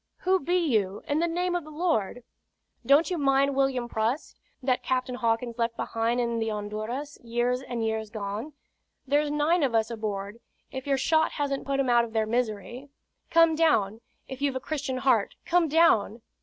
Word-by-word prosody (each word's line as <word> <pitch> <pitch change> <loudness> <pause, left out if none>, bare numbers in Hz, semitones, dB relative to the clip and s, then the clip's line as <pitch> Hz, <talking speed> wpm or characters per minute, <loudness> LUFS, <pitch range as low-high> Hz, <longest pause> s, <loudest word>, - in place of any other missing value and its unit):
"Who 375 +1 +2
be 355 +4 0
you, 215 - 0
in 290 +2 +1
the 340 - +2
name 355 +2 -1
of 350 -2 -1
the 310 - -12
Lord?" 300 - -1 0.6
"Don't 295 +6 +4
you 350 - -1
mind 275 0 +2
William 270 -3 +1
Prust, 230 +5 -2 0.2
that 255 -1 +1
Captain 255 -1 -1
Hawkins 235 0 -1
left 230 0 -1
behind 230 +2 -1
in 235 -1 0
the 225 0 -1
Honduras, 215 +7 -5
years 240 +2 0
and 240 -3 -3
years 220 -1 -2
agone? 215 +6 -5 0.5
There's 290 +2 +1
nine 300 +4 +2
of 260 -5 +1
us 225 +1 +1
aboard, 210 -1 -4 0.3
if 265 +1 -6
your 275 -1 +2
shot 315 +4 +2
hasn't 280 -2 -2
put 275 0 0
'em 260 -2 +2
out 240 0 +5
of 230 -1 -7
their 220 -1 +1
misery. 240 +3 -3 0.4
Come 330 -1 +5
down 230 -10 +2 0.3
if 265 0 -8
you've 280 -2 0
a - - -1
Christian 275 -2 -3
heart, 255 -5 +2
come 345 -1 +3
down!" 245 -9 +3
255 Hz, 185 wpm, -27 LUFS, 225-295 Hz, 0.6 s, out